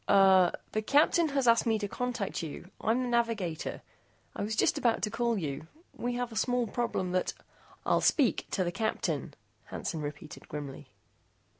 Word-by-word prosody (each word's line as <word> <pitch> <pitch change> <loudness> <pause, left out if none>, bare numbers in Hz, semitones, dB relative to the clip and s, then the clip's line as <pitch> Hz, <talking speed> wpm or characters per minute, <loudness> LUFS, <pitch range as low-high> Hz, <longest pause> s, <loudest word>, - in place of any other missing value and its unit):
"Er 190 -3 +6 0.2
the 215 - 0
Captain 300 +7 +4
has 275 -3 0
asked 230 0 +5
me 225 -1 +3
to 210 -1 -3
contact 245 -2 -3
you. 170 +3 -7
I'm 235 +4 +2
the - - -2
navigator. 230 -9 -1 0.5
I - - -4
was 215 +2 -1
just - - +3
about 235 -2 +1
to 210 - 0
call 235 0 0
you. 155 -3 -4 0.3
We 245 0 -3
have 245 -1 -2
a - - -9
small 245 +2 +1
problem 210 -5 -2
that 185 0 0 0.3
" - - -26
"I'll - - +3
speak 275 -7 +2
to 190 - 0
the 175 - -1
Captain," 220 +4 -2 0.3
Hansen 160 - -4
repeated 150 +1 -7
grimly. 145 -2 -6
220 Hz, 175 wpm, -30 LUFS, 180-240 Hz, 0.5 s, Er